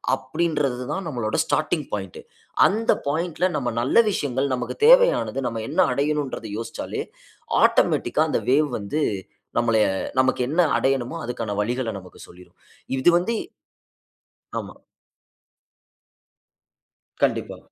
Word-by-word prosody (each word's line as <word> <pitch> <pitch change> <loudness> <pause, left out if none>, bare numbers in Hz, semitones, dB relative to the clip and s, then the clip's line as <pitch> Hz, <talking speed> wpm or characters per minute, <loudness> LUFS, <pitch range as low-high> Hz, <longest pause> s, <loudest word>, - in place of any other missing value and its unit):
அப்படின்றது 145 -6 -1
தான் 190 -2 -4
நம்மளோட 120 -7 -2
ஸ்டார்ட்டிங் 155 -1 0
பாயிண்ட். 95 -4 -4 0.5
அந்த 225 +3 +1 0.2
பாயிண்ட்ல 170 +4 -1
நம்ம 125 -3 -1
நல்ல 130 - +1
விஷயங்கள், 135 -4 -1
நமக்கு 125 0 -4
தேவையானது, - - +5
நம்ம 115 -1 -3
என்ன 165 +6 -2
அடையனும்ன்றது 140 -4 -2
யோசிச்சாலே, 115 - -5 0.6
ஆட்டோமேட்டிக்கா - - +3
அந்த - - 0
வேவ் 145 +2 +3
வந்து 105 +10 -3 0.6
நம்மளைய 115 -2 +3 0.3
நமக்கு 130 -1 +2
என்ன 165 +6 +2
அடையனுமோ, 135 +2 0
அதுக்கான 115 -4 -4
வழிகளை 120 +2 -1
நமக்கு 90 -1 -13
சொல்லிரும். 90 +1 -17 0.4
இது 130 - +4
வந்து 180 +7 +1 1.3
ஆமா. - - -8 2.5
கண்டிப்பா. - - 0
135 Hz, 110 wpm, -23 LUFS, 115-155 Hz, 2.5 s, தேவையானது